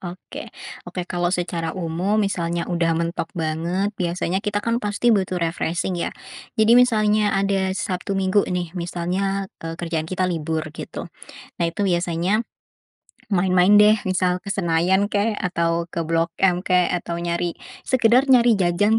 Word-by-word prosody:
Oke. 180 0 -8 0.4
Oke, 180 - -4
kalau 175 0 -1
secara 175 -1 -2
umum, 180 +4 -1
misalnya 175 -5 -1
udah 170 -2 0
mentok 170 0 -2
banget, 170 +5 -1
biasanya 175 +1 -1
kita, 205 -1 -2
kan, 235 +1 0
pasti 210 +3 +1
butuh 190 -3 0
refreshing, 170 +1 -1
ya. 175 -1 -2 0.5
Jadi 220 +1 +4
misalnya 215 -4 +4
ada 195 -1 +1
Sabtu 190 +1 -3
Minggu, 195 +1 +3
nih, 175 -2 -3
misalnya, 180 +3 -2 0.2
eee, 165 0 -5
kerjaan 165 -2 -3
kita 185 +1 -1
libur, 160 -3 -2
gitu. - - -7 0.6
Nah, 170 - +2
itu 200 +4 -1
biasanya, 175 +4 0 0.9
main-main, 185 -1 +3
deh, 210 +1 +7 0.2
misal 180 -1 0
ke 200 - -7
Senayan, 185 +2 +2
kek, 210 +1 0
atau 170 -1 -1
ke 170 0 -4
Blok 165 +1 0
M, 180 0 +2
kek, 180 -1 +3
atau 175 -1 -2
nyari 170 0 -2 0.3
sekedar 250 +1 +4
nyari 240 -4 +5
jajan 195 +5 +2
180 Hz, 150 wpm, -22 LUFS, 170-200 Hz, 0.9 s, deh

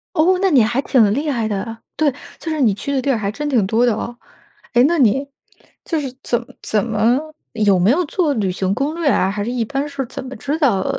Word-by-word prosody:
哦， 360 +3 +4
那 385 -2 +3
你 255 -6 +6
还 235 +4 0
挺 230 -9 +3
厉 295 +4 -1
害 235 -6 0
的！ 220 +2 -4 0.2
对， 305 -2 +2 0.3
就 325 - -4
是 310 - -1
你 220 -6 +4
去 280 +7 -5
的 265 - +1
地 280 - -2
儿 240 - +1
还 200 -1 -2
真 295 +5 -4
挺 235 -8 +2
多 225 +5 +2
的 240 - +3
哦。 240 - -5 0.6
诶， 245 - +5
那 335 +5 +3
你 270 +4 +3 0.6
就 325 -2 -1
是 270 -3 -4
怎 240 - 0 0.2
怎 215 +1 0
么 225 +3 +2 0.4
有 205 -4 +3
没 180 +4 +3
有 335 +8 +3
做 315 0 0
旅 195 -4 0
行 190 +1 -1
攻 280 +5 -1
略 330 -4 +1
啊？ 190 - +2
还 205 0 -3
是 240 - -3
一 240 -3 -1
般 280 +4 -2
是 280 -2 -4
怎 255 - -7
么 260 0 -8
知 290 +3 -3
道 210 - +2
250 Hz, 260 characters per minute, -19 LUFS, 215-285 Hz, 0.6 s, 你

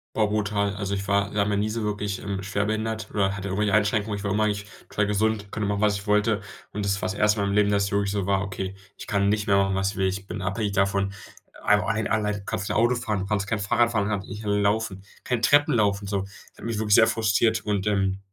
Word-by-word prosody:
Boah, 110 -1 +3
brutal. 105 -1 0
Also, 100 0 -2
ich 95 0 -4
war 100 0 +1
ja, 100 -1 +3
noch 105 -1 0
nie 105 +1 0
so 110 0 -3
wirklich, 105 -1 -2
ähm, 100 -1 -3
schwerbehindert 110 +2 -2
oder 100 -1 +1
hatte 100 0 -5
irgendwelche 100 +1 +1
Einschränkungen. 105 0 +1
Ich 100 - -7
war 100 - -1
immer 105 +1 +2
eigentlich, 105 -1 -1 0.2
total 100 - 0
gesund, 105 0 0
konnte 105 -2 -2
machen, 100 0 -1
was 105 -1 +3
ich 100 +2 -10
wollte. 105 0 +2 0.3
Und 105 0 -3
das 100 0 0
war's 95 - -1
1. 105 +1 +2
mal 100 - +1
im 100 - -1
Leben, 105 0 +3
dass 100 -1 +2
es 100 - -4
wirklich 100 0 +1
so 100 -2 -1
war: 100 0 +1
„Okay, 95 -1 -4 0.2
ich - - -8
kann 100 -1 +1
nicht 105 0 +1
mehr 100 -2 +3
machen 95 -1 +2
was 95 0 0
ich - - -11
will. 95 -1 +2
Ich 95 +1 -3
bin 100 0 -6
abhängig 100 +2 -1
davon, 100 0 +1 0.5
ein 105 0 +4
ein 110 0 -1
allein, 105 -1 0
kannst 100 - -3
nicht - - -1
Auto 120 +3 +3
fahren, 110 -4 -2
du 95 - -3
kannst 100 -2 0
kein 105 +1 -1
Fahrrad 120 +3 +2
fahren, 105 -2 0
hat 100 -2 -2
nicht 105 +3 -8
laufen, 105 -1 0 0.2
kein 120 -2 -1
Treppen 145 +1 +4
laufen 100 -2 +1
so.“ 100 -1 -1
Das 100 +1 -13
hat - - -10
mich 115 -2 -2
wirklich 105 -1 +3
sehr 110 - +7
frustriert 110 +1 +2
und, 105 -2 -1
ähm, 95 -2 +1
100 Hz, 260 wpm, -25 LUFS, 100-105 Hz, 0.5 s, sehr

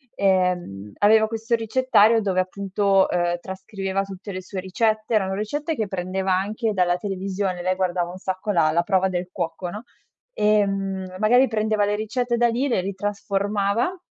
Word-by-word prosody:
Ehm, 180 - 0
aveva 220 +1 +5
questo 225 +1 -1
ricettario 225 -1 +3
dove, 190 -3 0
appunto, 195 +1 +1
ehm, 175 0 0
trascriveva 190 +1 -4
tutte 195 +1 -8
le 185 -1 -5
sue 190 +1 -6
ricette. 215 +4 -1
Erano 190 -2 +1
ricette 290 +10 -2
che 220 -6 -2
prendeva 190 0 -2
anche 215 +4 -1
dalla 180 -2 +2
televisione: 190 -1 -3
lei 185 +1 +1
guardava 180 -2 -1
un 180 - -9
sacco 190 +2 -3
la 165 -5 +3
la 170 +2 +2
prova 190 0 +2
del 180 0 -3
cuoco, 175 0 -4
no, 210 +5 -7 0.5
ehm, 195 - 0
magari 245 +5 +5
prendeva 215 -2 +1
le 205 0 0
ricette 235 +3 -1
da 240 0 +4
lì, 245 +5 0
le 235 -8 +1
ritrasformava. 200 - -1
195 Hz, 160 wpm, -23 LUFS, 185-215 Hz, 0.5 s, aveva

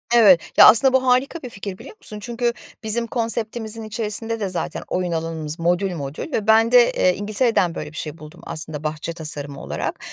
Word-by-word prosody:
Evet. 195 -8 +7 0.2
Ya, - - +10
aslında 260 +3 +6
bu 260 0 +3
harika 265 +6 +2
bir 250 - -7
fikir, 195 -3 -7
biliyor - - -12
musun? 210 - -6
Çünkü 235 +2 -2 0.3
bizim 230 +2 0
konseptimizin 225 -1 -1
içerisinde 220 +1 -3
de 200 -3 -2
zaten 180 - -4
oyun 180 -1 -2
alanımız 160 -1 -4
modül 180 +3 +1
modül 145 - -6
ve 215 -5 -2
ben 225 +2 +5
de, 245 -1 +6
eee, 180 -1 +2
İngiltere'den 205 -4 +1
böyle 150 -1 -6
bir 160 - -11
şey 155 0 -5
buldum 155 -1 -13
aslında 155 -1 -4
bahçe 155 +2 -4
tasarımı 145 -3 -5
olarak - - -4
205 Hz, 190 wpm, -21 LUFS, 165-230 Hz, 0.3 s, Ya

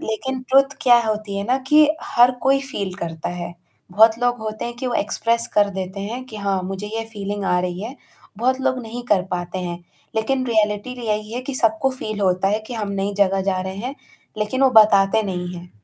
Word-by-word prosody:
लेकिन 260 +4 -3
ट्रुथ 275 +1 +4
क्या 240 -3 +7
होती 215 -2 -2
है 200 - -1
ना 255 +2 +2
कि 300 0 +6 0.2
हर 245 +1 +5
कोई 275 +1 +3
फील 195 -8 -4
करता 165 -2 -5
है। 175 -1 -5 0.4
बहुत 220 +4 +5
लोग 245 0 +1
होते 215 0 -4
हैं 240 0 -4
कि 255 - -4
वो 245 - -1
एक्सप्रेस 230 +1 0
कर 205 -1 +4
देते 190 0 -5
हैं 235 +6 -5
कि 220 - -9
हाँ, 195 -2 -1
मुझे 195 +2 -5
ये 225 +2 -4
फीलिंग 205 -1 -4
आ 180 -1 +2
रही 180 +1 -3
है, 250 +5 -6 0.4
बहुत 260 +2 +1
लोग 260 -1 0
नहीं 235 +2 -6
कर 190 - +3
पाते 175 +1 -3
हैं। 175 0 -5 0.4
लेकिन 255 +3 0
रियलिटी 215 +1 0
र 250 - -10
यही 215 +1 -2
है 245 - -2
कि 270 - -5
सबको 225 +2 +2
फील 215 -1 -4
होता 185 0 +2
है 220 - -1
कि - - -3
हम 200 - -3
नई 200 +1 -2
जगह 195 0 +1
जा 185 -1 -1
रहे 190 +1 -5
हैं, 270 - -4 0.4
लेकिन 235 +6 -1
वो 265 - +6
बताते 200 0 +4
नहीं 180 0 -4
हैं। 175 0 -10
215 Hz, 220 wpm, -21 LUFS, 195-245 Hz, 0.4 s, क्या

